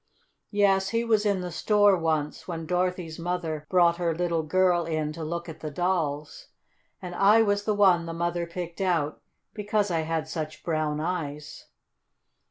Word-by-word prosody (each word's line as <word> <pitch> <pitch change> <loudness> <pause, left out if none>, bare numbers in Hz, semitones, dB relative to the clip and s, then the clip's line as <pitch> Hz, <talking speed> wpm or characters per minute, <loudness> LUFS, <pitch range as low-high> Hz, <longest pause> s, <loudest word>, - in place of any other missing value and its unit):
"Yes, 195 -2 +2
he 230 +2 0
was 220 -2 +2
in 200 -2 +1
the 180 -1 -5
store 205 +1 +4
once, 160 -3 -2
when 165 -2 -5
Dorothy's 180 -1 -2
mother 165 -3 -3
brought 175 -2 +4
her 170 -2 0
little 170 -1 0
girl 175 +1 +2
in 155 -2 -2
to 165 0 -6
look 170 +2 -4
at 160 -1 -9 0.2
dolls, 160 -5 -2 0.6
and 180 -1 -6
I 210 +5 +5
was 205 -1 0
the 215 - +1
one 180 -5 +4
the - - -4
mother 170 0 -2
picked 170 +1 -6
out 165 -6 0 0.3
because 205 -1 -1
I 165 - +1
had 160 0 -2
such 155 -1 -5
brown 155 -2 -1
eyes." 150 -3 -4
170 Hz, 165 wpm, -26 LUFS, 160-190 Hz, 0.6 s, I